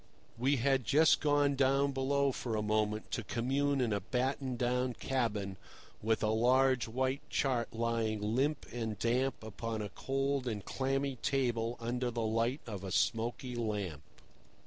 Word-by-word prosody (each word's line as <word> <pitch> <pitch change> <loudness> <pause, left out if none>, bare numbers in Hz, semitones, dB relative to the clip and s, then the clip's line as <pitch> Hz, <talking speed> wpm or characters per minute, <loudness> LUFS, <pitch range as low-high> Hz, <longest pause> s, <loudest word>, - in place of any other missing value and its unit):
We 130 +5 +2
had 135 +1 +2
just 155 +6 +5
gone 145 -1 +3
down 135 +1 +3
below 140 +1 +1
for 120 -3 -3
a 105 - 0
moment 105 0 0
to 120 - -2
commune 135 +6 0
in 120 -4 +1
a 100 - +1
battened 130 +2 -1
down 125 0 0
cabin, 105 -7 -1 0.4
with 110 +1 +1
a 105 - +2
large 125 +2 +3
white 130 +4 -1
chart 125 -4 0
lying 115 -2 -1
limp 130 +8 0
and 115 -3 -3
damp 120 +3 0
upon 110 0 -4
a 105 - -5
cold 135 +4 -1
and 105 -5 -3
clammy 135 0 -1
table 120 -3 0
under 120 +1 -1
the 115 -1 -2
light 115 +5 0
of 100 -4 -6
a 95 - -5
smoky 120 +5 0
lamp. 105 -10 -2
120 Hz, 155 wpm, -33 LUFS, 110-135 Hz, 0.4 s, just